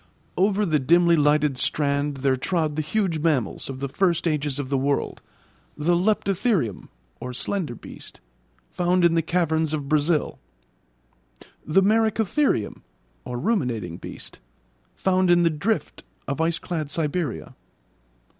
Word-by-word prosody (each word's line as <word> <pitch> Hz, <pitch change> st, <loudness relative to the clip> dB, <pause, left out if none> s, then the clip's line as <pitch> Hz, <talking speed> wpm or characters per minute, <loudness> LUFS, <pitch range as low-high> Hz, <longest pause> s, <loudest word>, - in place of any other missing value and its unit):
Over 200 Hz, +2 st, +2 dB
the 155 Hz, -5 st, +2 dB
dimly 170 Hz, +5 st, +4 dB
lighted 150 Hz, -3 st, +2 dB
strand 145 Hz, -1 st, 0 dB
there 135 Hz, -1 st, +4 dB
trod 155 Hz, +2 st, -1 dB
the 155 Hz, -, 0 dB
huge 170 Hz, +1 st, -1 dB
mammals 145 Hz, -10 st, -1 dB
of 135 Hz, -1 st, -6 dB
the 140 Hz, -, -1 dB
first 175 Hz, +3 st, +1 dB
ages 150 Hz, -3 st, -1 dB
of 140 Hz, -2 st, -4 dB
the 140 Hz, -, +1 dB
world, 140 Hz, +1 st, -1 dB, 0.6 s
the 170 Hz, +4 st, +2 dB
leptotherium 195 Hz, -, 0 dB, 0.4 s
(slender 155 Hz, 0 st, -2 dB
beast), -, -, -11 dB, 0.5 s
found 180 Hz, 0 st, +2 dB
in 170 Hz, -, +4 dB
the 165 Hz, -, +3 dB
caverns 160 Hz, -2 st, 0 dB
of 145 Hz, -3 st, -3 dB
Brazil; 150 Hz, +1 st, +1 dB, 1.2 s
the 190 Hz, +6 st, +3 dB
merycotherium 220 Hz, -, +1 dB, 0.5 s
(ruminating 120 Hz, -, -1 dB
beast), -, -, -9 dB, 0.6 s
found 185 Hz, -1 st, +1 dB
in 175 Hz, 0 st, +5 dB
the 165 Hz, -, +3 dB
'drift' 200 Hz, +9 st, -2 dB, 0.2 s
of 140 Hz, +3 st, -3 dB
iceclad 165 Hz, -2 st, -2 dB
Siberia. 150 Hz, -, -2 dB
160 Hz, 125 wpm, -24 LUFS, 140-180 Hz, 1.2 s, in